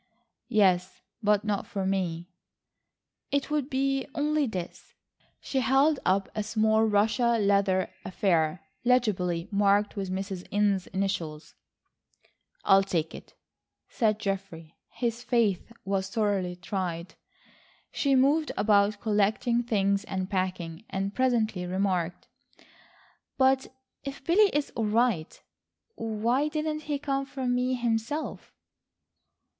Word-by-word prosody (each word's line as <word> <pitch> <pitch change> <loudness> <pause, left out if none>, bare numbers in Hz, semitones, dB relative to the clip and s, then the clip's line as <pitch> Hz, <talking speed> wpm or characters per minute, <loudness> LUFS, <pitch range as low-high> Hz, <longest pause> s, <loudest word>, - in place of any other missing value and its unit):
"Yes, 190 -5 +2 0.2
but 210 -1 +3
not 205 -2 -1
for 195 -2 -3
me." 180 -3 -1 1.0
"It 280 +1 -1
would 295 -3 0
be 270 0 0
only 300 -1 +1
this." 185 -6 -7 0.4
She 270 - -2
held 270 +3 +3
up 190 +1 +2
a 215 - -2
small 220 +1 +2
Russia 225 +3 +2
leather 200 -2 +2
affair 175 -3 0 0.2
legibly 195 -9 +1
marked 205 0 +2
with 195 -2 -3
Mrs. 190 -1 -4
Inness' 200 -2 +1
initials. 185 -6 -3 1.1
"I 195 - +6
will - - +5
take 165 -4 -2
it," - - -12 0.5
said 215 -4 +1
Geoffrey. 195 -6 -5
His 235 -1 -3
faith 230 -5 +1
was 190 -1 -1
sorely 195 -3 0
tried. 180 -2 -4 0.8
She 275 -2 +1
moved 290 +4 +3
about 205 -1 +3
collecting 215 +3 +1
things 200 -4 +1
and 190 -3 -3
packing, 185 -2 -2
and 195 +1 -2
presently 225 -8 +1
remarked: 180 -2 -1 1.1
"But 265 0 +3 0.4
if 275 0 -7
Billy 400 +5 +5
is 295 -1 -1
all 225 - -2
right, 215 -6 +1 0.5
why 225 +5 0
didn't 305 0 -3
he 290 - +1
come 275 -1 -2
for 270 -1 -5
me 250 +1 +1
himself?" 240 +5 -2
210 Hz, 120 wpm, -28 LUFS, 190-250 Hz, 1.1 s, I